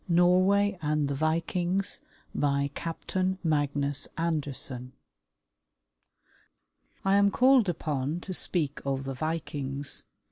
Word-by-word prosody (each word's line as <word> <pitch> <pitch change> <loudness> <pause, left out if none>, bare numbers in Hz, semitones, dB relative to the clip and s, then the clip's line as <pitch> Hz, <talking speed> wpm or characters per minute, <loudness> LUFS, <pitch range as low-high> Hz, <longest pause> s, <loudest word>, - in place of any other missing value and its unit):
NORWAY 185 +3 +4
AND 150 -1 +1
THE - - -1
VIKINGS 175 +5 0 0.3
BY 140 -1 +1
CAPTAIN 185 +3 -2
MAGNUS 145 -3 +1
ANDERSEN 140 -6 -1 2.1
I 195 +1 +4
am 200 0 +5
called 250 -2 +4
upon 150 -2 -2
to 185 - -5
speak 155 -5 0
of 135 -1 -2
the 135 0 -4
Vikings. 145 -2 -3
155 Hz, 100 wpm, -28 LUFS, 140-180 Hz, 2.1 s, am